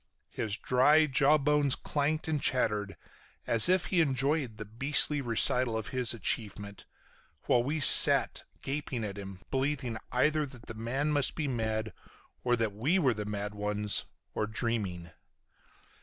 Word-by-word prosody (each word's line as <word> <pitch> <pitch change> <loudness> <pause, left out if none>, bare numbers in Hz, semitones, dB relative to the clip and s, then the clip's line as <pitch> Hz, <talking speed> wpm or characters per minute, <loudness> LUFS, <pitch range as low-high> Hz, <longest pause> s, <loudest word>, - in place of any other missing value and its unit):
His 110 -1 -3
dry 145 +7 +3
jaw 145 +1 +3
bones 145 -1 +2
clanked 150 +2 -2
and 155 -3 -2
chattered 105 -5 -1 0.5
as 115 +7 +6
if 185 -1 +2
he 175 - +4
enjoyed 135 -4 -1
the 110 - -7
beastly 140 +6 +2
recital 120 -1 +1
of 110 - -6
his 125 -3 +2
achievement, 105 -2 -4 0.6
while 120 - +2
we 145 +6 -3
sat - - +5 0.2
gaping 135 -4 -4
at 100 -1 -6
him, 95 -1 -10
believing 130 -4 -2
either 150 +4 +1
that 125 -3 -14
the - - -8
man 125 +7 -3
must 145 -2 0
be 155 -3 -3
mad, 110 -3 -3 0.5
or 120 -1 +2
that 115 -3 -2
we 135 - 0
were 135 -9 +2
the 105 -1 -6
mad 105 0 -5
ones, 105 0 -1 0.3
or 105 - -2
dreaming. 105 -7 -4
125 Hz, 150 wpm, -29 LUFS, 110-145 Hz, 0.6 s, as